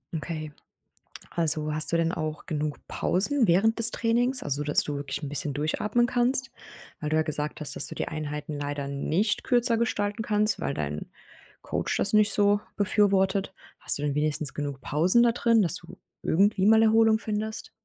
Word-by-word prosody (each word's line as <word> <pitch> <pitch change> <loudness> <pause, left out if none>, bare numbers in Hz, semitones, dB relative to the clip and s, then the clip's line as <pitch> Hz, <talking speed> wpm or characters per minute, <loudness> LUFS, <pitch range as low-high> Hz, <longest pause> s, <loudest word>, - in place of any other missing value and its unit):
Okay. 155 -1 -5 0.8
Also, 155 -2 +1
hast 155 +2 0
du - - +3
denn 165 0 +1
auch 155 -2 -5
genug 150 -3 -3
Pausen 230 +5 +1
während 205 +7 +3
des 230 0 +6
Trainings, 240 +3 0
also, 145 0 -2
dass 150 0 +1
du 150 - -3
wirklich 140 +1 -5
'n 145 - -4
bisschen 145 0 -3
durchatmen 210 - 0
kannst? 255 +2 0 0.5
Weil 150 - -3
du 155 - +1
ja 160 - +3
gesagt 150 0 -4
hast, 150 - -5
dass - - 0
du - - -8
die - - -3
Einheiten 150 -1 -5
leider 145 -1 -4
nicht 165 +9 -1
kürzer 240 -1 +2
gestalten 205 -2 -1
kannst, 210 -1 +1
weil 140 - -2
dein 75 - -5 0.5
Coach - - -2
das - - 0
nicht 215 -1 +4
so 205 0 +3 0.2
befürwortet. 195 -1 +1 0.3
Hast - - +3
du - - -6
denn 145 -1 -1
wenigstens 150 -1 0
genug 145 -2 -4
Pausen 175 +13 +3
da 235 -1 +4
drin, 230 -2 +3
dass 175 -1 0
du 170 - -11 0.2
irgendwie 195 +2 +2
mal 220 +1 +6
Erholung 220 0 +4
findest? 215 0 -4
180 Hz, 180 wpm, -26 LUFS, 150-220 Hz, 0.8 s, des